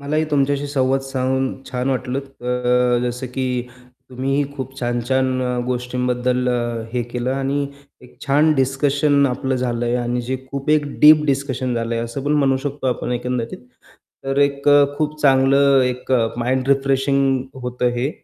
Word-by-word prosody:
मलाही 155 +3 0
तुमच्याशी 140 0 +1
संवाद 135 -1 +1
साधून 130 0 -1 0.2
छान 125 +1 -2
वाटलं. 130 0 -2
अ, 135 -3 -13 0.6
अ, 125 - 0
जसं 125 +2 -5
की 130 -1 -1 0.6
तुम्हीही 135 +3 0
खूप 130 0 -6
छान-छान 120 +2 0 0.4
गोष्टींबद्दल 125 0 -1
अ, 120 -2 -2
हे 125 -1 0
केलं 120 +1 -3
आणि 140 +1 -1 0.4
एक 125 - -17
छान 150 +3 +4
डिस्कशन 140 +1 +2
आपलं 130 0 -1
झालंय 120 -1 -1
आणि 120 0 -1
जे 130 - 0
खूप 140 +1 -3
एक 150 -1 +3
डीप 150 0 +8
डिस्कशन 130 -3 -1
झालं 115 0 -2
आहे, 115 0 -1
असं 125 +4 -6
पण 145 - +1
म्हणू 135 -2 +3
शकतो 140 -1 -4
आपण 125 -1 -1
एकंदरीत. 120 -1 -3 0.7
तर 135 +1 -1
एक 140 0 +1 0.3
खूप 155 0 -2
चांगलं 135 0 +4
एक 125 +1 -2 0.3
माइंड 130 +2 -1
रिफ्रेशिंग 135 -1 +2 0.2
होतं 125 0 -1
हे. 125 +4 -1
130 Hz, 150 wpm, -20 LUFS, 125-140 Hz, 0.7 s, डीप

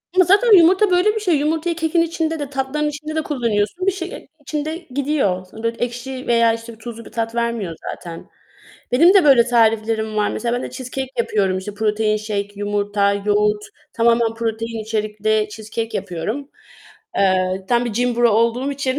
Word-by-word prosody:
Ama 370 - +6
zaten 410 +3 +6
yumurta 370 +4 +5
böyle 365 +5 +3
bir 440 - 0
şey. 365 -6 +1
Yumurtayı 320 +3 0
kekin 325 +1 +1
içinde 325 -1 -1
de 290 -2 -4
tatlıların 280 +2 -1
içinde 305 +1 -6
de 315 - +1
kullanıyorsun. 250 - -1
Bir - - +5
şey, 370 -2 -5
ııı, - - -8 0.2
içinde 305 +2 -3
gidiyor. 265 -10 0
Sonra 220 - -10
da 230 - +2
ekşi 250 +2 -5
veya, 230 -1 +4
işte, 230 0 -8
tuzlu 230 +1 -9
bir - - -12
tat 230 0 -3
vermiyor 235 -7 -2 0.2
zaten. 170 -2 -9 0.6
Benim 335 +9 +6
de 385 -4 +6
böyle 265 -5 +6
tariflerim 220 -2 +1
var. 210 -1 +1
Mesela 240 0 -2
ben 245 - -3
de - - -5
cheesecake 260 +1 -5
yapıyorum. 195 -5 +1
İşte, 200 +2 -7
protein 215 0 +1
shake 210 -1 -3
yumurta, 205 0 0
yoğurt, 210 +1 +1 0.3
tamamen 230 -1 +2
protein 225 0 -3
içerikli 215 0 -1
cheesecake 220 +2 -5
yapıyorum. 205 - -4 0.7
Eee, 185 -1 +1
tam 240 0 +2
bir 240 - -3
gym 245 +2 0
bro 240 0 +4
olduğum 235 +5 +1
için, 275 -1 -2
235 Hz, 175 wpm, -20 LUFS, 215-290 Hz, 0.7 s, Ama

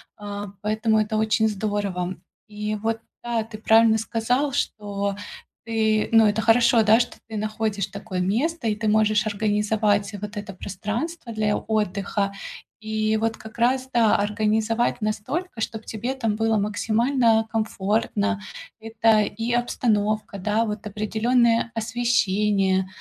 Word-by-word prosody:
а, 205 -1 -6
поэтому 220 +1 +1
это 215 0 0
очень 220 0 +2
здорово. 200 -3 -2 0.3
И 210 0 -3
вот 225 +2 -2 0.2
да, 235 -2 -1
ты 215 0 -10
правильно 220 +1 +5
сказал, 245 +6 0
что 200 -3 -2 0.5
ты 220 -1 +1
ну, 225 -1 +6
это 210 +1 +1
хорошо, 230 0 +4
да, 215 +2 +5
что 245 - -2
ты 220 - -7
находишь 215 -1 -2
такое 200 -2 -6
место 235 - 0
и 215 - +1
ты 215 +1 -3
можешь 215 0 +3
организовать 210 0 +1
вот 210 +1 -6
это 205 -1 -6
пространство 225 - -5
для 215 -1 +1
отдыха, 200 -1 -1 0.5
и 215 0 0
вот 225 +1 0
как 220 +2 -12
раз, 255 +2 +1
да, 230 -4 +4
организовать 215 +3 0
настолько, 225 - -3
чтоб 220 0 -3
тебе 230 +5 -4
там 225 -6 -1
было 225 0 +1
максимально 225 +2 +2
комфортно. 215 -1 0 0.4
Это 225 -1 +2
и 225 +3 -3
обстановка, 215 -4 0
да, 210 +4 +1
вот 210 -1 -4
определённое 230 +3 +1
освещение, 210 -4 +1
215 Hz, 135 wpm, -24 LUFS, 210-225 Hz, 0.5 s, ну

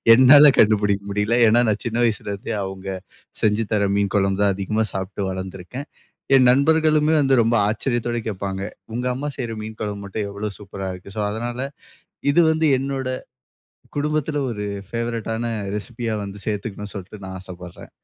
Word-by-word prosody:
என்னால 140 +4 +9
கண்டுபிடிக்க 105 -2 +3
முடியல. 105 +3 +1
ஏன்னா 115 +2 +5
நான் 105 -1 -1
சின்ன 115 +1 -1
வயசுல 105 -2 -1
இருந்தே 100 +2 -4
அவுங்க, 95 0 -6 0.5
செஞ்சு 110 +1 +2
தர்ற 100 -2 +2
மீன் 100 -1 0
குழம்பு 95 0 +1
தான் 100 -2 +3
அதிகமா 110 +3 0
சாப்பிட்டு 95 0 -3
வளர்ந்திருக்கேன். 95 +8 -6 0.5
என் 130 -2 +6
நண்பர்களுமே 155 +2 +3
வந்து 135 -1 +4
ரொம்ப 115 +1 +2
ஆச்சரியத்தோட 120 +1 -1
கேப்பாங்க, 95 -2 -3 0.3
"உங்க 125 +2 -2
அம்மா 140 +3 -3
செய்யற 120 -3 -3
மீன் 110 0 -7
குழம்பு 100 -1 -3
மட்டும் 100 +1 -3
எவ்வளோ 100 +1 -4
சூப்பரா 95 -1 -6
இருக்கு!" 90 +2 -11
சோ - - 0
அதனால, 120 +3 -4 0.7
இது 175 - +5
வந்து 160 0 +2
என்னோட, 135 -1 -3 0.9
குடும்பத்துல 150 0 0
ஒரு 105 -3 -4 0.2
ஃபேவரைட்டான 115 0 -3 0.3
ரெசிபியா 115 +1 -4
வந்து 100 +1 -8
சேத்துக்கணும்னு 105 -1 -4
சொல்ட்டு, 100 +2 -9
நான் 95 0 -6
ஆசப்படுறேன். 90 -1 -11
110 Hz, 155 wpm, -22 LUFS, 100-125 Hz, 0.9 s, என்னால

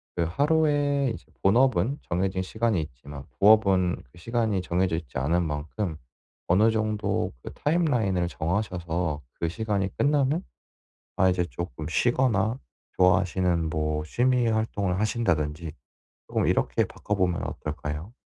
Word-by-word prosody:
그 85 - +1
하루에 145 - +2
이제 - - -13 0.2
본업은 125 +3 +3
정해진 95 +2 0
시간이 110 -1 0
있지만 70 0 -9 0.2
부업은 100 -4 +4
그 - - -19
시간이 110 0 0
정해져 90 -1 0
있지 80 -5 -7
않은 80 +7 +1
만큼 80 +4 -3 0.5
어느 100 +5 +4
정도 110 -1 -1
그 - - -8
타임라인을 125 - +1
정하셔서 85 -3 -2 0.2
그 85 - 0
시간이 100 0 -2
끝나면 145 +4 +2 0.7
아 95 0 +4
이제 90 -1 +1
쪼끔 85 -3 -6
쉬거나 120 +2 +1 0.4
좋아하시는 90 -2 +2
뭐 75 -1 -1
취미 125 +7 +2
활동을 100 -4 0
하신다든지 85 -8 0 0.6
쪼금 - - 0
이렇게 - - +2
바꿔 105 - -4
보면 90 -3 0
어떨까요? 75 +6 -5
95 Hz, 300 characters per minute, -26 LUFS, 85-115 Hz, 0.7 s, 부업은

